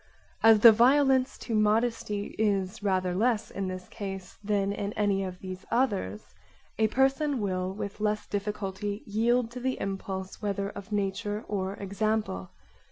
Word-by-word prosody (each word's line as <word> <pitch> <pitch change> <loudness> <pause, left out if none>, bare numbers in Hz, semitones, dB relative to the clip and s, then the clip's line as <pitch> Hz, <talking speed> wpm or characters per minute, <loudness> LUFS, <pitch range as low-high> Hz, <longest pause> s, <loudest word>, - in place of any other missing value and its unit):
As 220 -1 +7
the 230 - +11
violence 260 +3 +4
to 235 - -5
modesty 215 -1 +1
is 200 -1 0
rather 185 -3 +1
less 220 +3 +1
in 195 -1 -3
this 185 0 -6
case 195 -3 -7
than 200 -1 +1
in 205 0 -3
any 200 -2 +1
of 185 -1 -5
these 185 0 -7
others, 200 - -1 0.5
a 220 - +4
person 270 +3 +2
will 185 -2 -1
with 200 +1 -6
less 210 0 0
difficulty 205 0 -3
yield 230 +3 +1
to 250 - -6
the 260 +1 -2
impulse 190 -1 -4
whether 200 -1 -1
of 200 +1 -10
nature 205 +1 -2
or 195 -1 -2
example. 200 - -2
205 Hz, 150 wpm, -28 LUFS, 195-225 Hz, 0.5 s, the